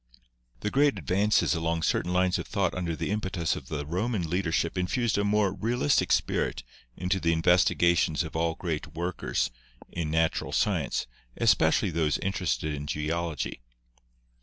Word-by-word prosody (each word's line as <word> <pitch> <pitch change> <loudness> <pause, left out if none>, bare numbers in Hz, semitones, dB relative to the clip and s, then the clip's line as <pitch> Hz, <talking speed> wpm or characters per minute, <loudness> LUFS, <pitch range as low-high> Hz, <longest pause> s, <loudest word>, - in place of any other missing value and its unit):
The 105 - -2
great 140 -3 +3
advances 100 +6 +2
along 80 0 -1
certain 90 - 0
lines 90 0 +2
of 85 - -5
thought 100 -4 0
under 85 -3 -2
the 80 - -3
impetus 95 -6 -1
of 65 - -8
the 75 -2 -4
Roman 90 +3 -1
leadership 85 0 0
infused 110 +6 0
a - - +1
more 100 -2 +2
real 115 +4 -2
istic 75 - +2
spirit - - 0 0.3
into 90 +2 0
the 85 -2 +1
investigations 85 0 +3
of 80 - -8
all 80 0 0
great 80 -3 -4
workers 85 +2 -1 0.4
in 85 -3 -3
Natural 80 +1 0
Science, - - 0 0.3
especially - - +3
those 80 -2 +1
interested 90 -5 -1
in 75 0 -5
Geology. 80 -2 -3
85 Hz, 150 wpm, -28 LUFS, 80-95 Hz, 0.4 s, great